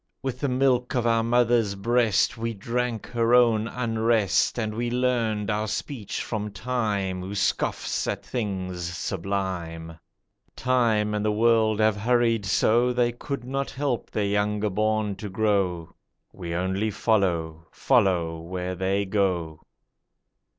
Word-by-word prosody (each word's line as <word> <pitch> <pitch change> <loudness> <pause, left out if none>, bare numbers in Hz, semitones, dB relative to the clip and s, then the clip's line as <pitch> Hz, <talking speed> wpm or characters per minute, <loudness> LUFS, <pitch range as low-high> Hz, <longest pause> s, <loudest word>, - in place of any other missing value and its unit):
With 130 -2 -3
the 140 - -1
milk 125 0 +1
of 120 -2 +1
our 115 -1 +3
mother's 115 -3 +2
breast 115 0 +2
We 115 0 -3
drank 115 +2 -2
her 120 0 +2
own 115 -3 +4
unrest, 115 -4 +1
And 110 -2 -2
we 120 +2 -2
learned 120 -4 0
our 105 +1 -1
speech 110 0 -4
from 105 -2 -3
Time 105 -5 -2
Who 95 +2 -6
scoffs 100 - -1
at - - -3
the - - -21
things 95 -6 -3
sublime. 85 -2 -4 0.6
Time 115 -4 +1
and 105 0 -1
the 105 - +2
World 110 0 +3
have 110 -1 +3
hurried 115 -1 +1
so 120 +5 +3
They 120 -1 +1
could 130 +2 -5
not 135 +2 -3
help 135 -3 -2
their 105 - -1
younger 105 +1 0
born 110 0 0
to 105 +1 -6
grow; 95 -5 0 0.4
We 85 -1 -5
only 95 +4 -1
follow, 85 -7 0
follow 90 -10 +1
where 90 +2 -4
they 95 +2 0
go. 90 -6 -1
110 Hz, 140 wpm, -25 LUFS, 95-120 Hz, 0.6 s, own